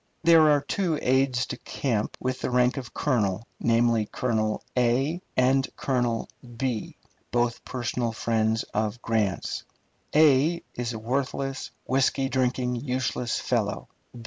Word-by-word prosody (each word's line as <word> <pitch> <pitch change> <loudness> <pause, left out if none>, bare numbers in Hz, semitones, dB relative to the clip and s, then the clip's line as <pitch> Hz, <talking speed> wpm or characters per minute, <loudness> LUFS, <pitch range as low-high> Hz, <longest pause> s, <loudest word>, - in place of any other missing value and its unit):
There 165 -2 +7
are 145 -1 +4
two 165 +2 -1
aides 130 -1 +2
de - - -6
camp 115 -6 -2
with 130 0 -2
the - - -1
rank 125 0 +3
of 125 -2 -6
colonel, 110 -7 0
namely, 115 -2 +2
Colonel 110 -3 -1
and 130 +7 +1 0.5
Colonel, 120 -4 0 1.0
both 120 -1 0
personal 120 -1 -2
friends 110 0 0
of 110 +2 -1
Grant's. 110 -4 -1 0.5
is 145 -4 +3
a - - -4
worthless, 135 +3 -2 0.2
whisky 135 +1 +1
drinking, 125 -1 0
useless 125 -2 -1
fellow. - - -1
125 Hz, 115 wpm, -26 LUFS, 115-135 Hz, 1.0 s, There